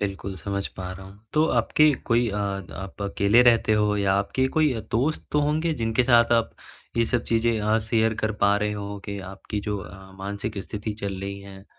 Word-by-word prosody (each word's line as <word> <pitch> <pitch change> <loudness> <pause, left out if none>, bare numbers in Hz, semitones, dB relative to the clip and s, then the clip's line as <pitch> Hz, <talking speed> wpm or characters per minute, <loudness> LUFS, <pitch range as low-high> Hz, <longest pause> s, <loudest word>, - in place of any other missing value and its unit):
बिल्कुल, 100 -1 -3
समझ 100 +3 -3
पा 90 -1 -5
रहा 95 +1 -10
हूँ। 95 +1 -14
तो 155 - +4
आपके 150 0 +4
कोई 120 0 +3
अ, 105 - -3
द 100 -2 -3
आप 95 +1 -9
अकेले 100 +3 +4
रहते 115 -2 +4
हो, 105 -1 +2
या 100 -1 +2
आपके 100 +7 +1
कोई 155 -3 +4
अ, 115 - -3
दोस्त 135 +7 0
तो 150 - +3
होंगे 155 +3 +1
जिनके 115 -1 +1
साथ 120 -1 +5
आप 115 -1 +2 0.5
ये 115 - +4
सब 120 -1 0
चीज़ें 115 -1 +1
अ, 105 +1 +2
शेयर 110 0 +1
कर 110 0 +1
पा 100 0 +5
रहे 105 0 -1
हों 100 0 -5
कि 100 -1 -5
आपकी 95 +2 -5
जो 105 0 -3
अ, 95 +1 -11
मानसिक 100 +2 -4
स्थिति 105 0 -5
चल 100 -2 -4
रही 100 0 -5
है? 100 -1 -12
105 Hz, 215 wpm, -25 LUFS, 100-115 Hz, 0.5 s, साथ